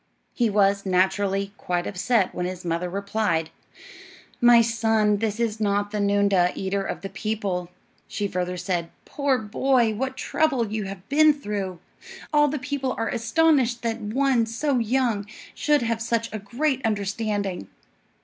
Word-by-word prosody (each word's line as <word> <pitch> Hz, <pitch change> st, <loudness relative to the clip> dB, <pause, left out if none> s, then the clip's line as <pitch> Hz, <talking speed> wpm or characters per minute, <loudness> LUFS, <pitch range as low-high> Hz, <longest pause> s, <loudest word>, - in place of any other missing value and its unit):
He 235 Hz, -3 st, +1 dB
was, 200 Hz, -1 st, +2 dB
naturally, 195 Hz, +1 st, +1 dB
quite 175 Hz, -1 st, -2 dB
upset 205 Hz, +1 st, +1 dB
when 180 Hz, 0 st, -2 dB
his 185 Hz, -1 st, -7 dB
mother 170 Hz, +1 st, -1 dB
replied, 200 Hz, -4 st, -1 dB, 0.9 s
"My 240 Hz, -1 st, +7 dB
son, 220 Hz, -2 st, +2 dB
this 215 Hz, +1 st, -2 dB
is 225 Hz, -2 st, -1 dB
not 205 Hz, -1 st, 0 dB
the 210 Hz, -, -2 dB
noondah, 200 Hz, -3 st, +2 dB
eater 195 Hz, +1 st, -2 dB
of 195 Hz, -, -4 dB
the 195 Hz, -, -5 dB
people." 195 Hz, -3 st, -3 dB, 0.4 s
She 205 Hz, -, -2 dB
further 180 Hz, -1 st, -3 dB
said: 175 Hz, -2 st, -2 dB, 0.2 s
"Poor 280 Hz, -2 st, 0 dB
boy! 235 Hz, +1 st, +1 dB
what 260 Hz, +4 st, -3 dB
trouble 265 Hz, -9 st, 0 dB
you 215 Hz, -2 st, -2 dB
have 195 Hz, -1 st, -8 dB
been 305 Hz, +2 st, +5 dB
through. 205 Hz, -9 st, -4 dB, 0.6 s
All 295 Hz, 0 st, +5 dB
the 295 Hz, +1 st, -2 dB
people 265 Hz, -1 st, -3 dB
are 225 Hz, -, -1 dB
astonished 250 Hz, -1 st, +2 dB
that 230 Hz, -1 st, -2 dB
one 240 Hz, +2 st, +1 dB
so 255 Hz, +3 st, 0 dB
young 230 Hz, -3 st, 0 dB, 0.3 s
should 295 Hz, -3 st, +2 dB
have 230 Hz, -1 st, -1 dB
such 230 Hz, -1 st, -1 dB
a 215 Hz, -, -3 dB
great 260 Hz, +6 st, -1 dB
understanding!" 200 Hz, -, -2 dB
215 Hz, 150 wpm, -24 LUFS, 195-240 Hz, 0.9 s, My